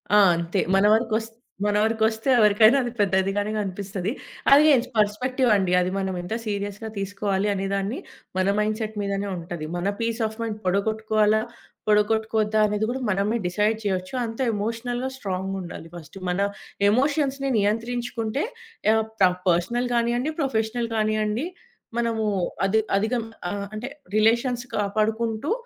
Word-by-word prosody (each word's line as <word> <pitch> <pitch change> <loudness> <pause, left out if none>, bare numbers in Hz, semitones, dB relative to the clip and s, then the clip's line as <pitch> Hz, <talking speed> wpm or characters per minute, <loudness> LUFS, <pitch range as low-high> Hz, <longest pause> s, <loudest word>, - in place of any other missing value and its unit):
ఆ! - - +8 0.2
అంతే. 170 +3 -1 0.2
మన 195 - +4
వరుకొస్ 225 0 +1 0.4
మన 205 0 +1
వరుకొస్తే 220 +2 +1
ఎవరికైనా 215 +4 +6
అది 240 - -3
పెద్దదిగానే 195 +1 +1
కనిపిస్తది. 195 0 -3 0.4
అది 290 +2 +8
యెస్. 250 -2 +3
పెర్‌స్పెక్టివండి. 215 -2 +2
అది 180 0 0
మనమెంత 190 0 -3
సీరియస్‌గా 205 0 -4
తీసుకోవాలి 200 0 -1
అనే 195 0 -2
దాన్ని, 200 +5 -1 0.4
మన 185 +1 +2
మైండ్‌సెట్ 215 0 -1
మీదనే 200 0 -2
ఉంటది. 170 -2 -6
మన 175 +2 -1
పీస్ 230 0 -1
ఆఫ్ 220 +1 -5
మైండ్ 220 -2 -3
పడగొట్టుకోవాలా, 215 +2 +2 0.5
పడగొట్టుకోవద్దా 215 0 +2
అనేది 210 +1 0
గూడా 260 +2 -3
మనమే 205 +4 +1
డిసైడ్ 210 +4 +1
చెయొచ్చు. 185 0 -2
అంత 225 +1 -7
ఎమోషనల్‌గా, 235 +4 -2
స్ట్రాంగుండాలి 190 -5 -4
ఫస్ట్. 170 +2 -11
మన 180 +1 -1 0.5
ఎమోషన్స్‌ని 275 +3 +1
నియంత్రించుకుంటే, 230 +3 -1 0.5
యాహ్! 220 0 +3 0.2
ప్ర 185 - +7 0.2
పర్సనల్ 235 +9 +1
గానియ్యండి, 240 +5 +1
ప్రొఫెషనల్ 230 -3 -1
కానియ్యండి, 215 +5 0 0.5
మనమూ 225 -2 0 0.4
అధి 220 +3 +3 0.2
అధిగం 225 +2 -1 0.3
ఆహ్, 200 0 -4
అంటే, 235 +5 -5 0.3
రిలేషన్స్ 235 +3 +2
కాపాడుకుంటూ, 220 +4 0
215 Hz, 125 wpm, -24 LUFS, 200-230 Hz, 0.5 s, ఆ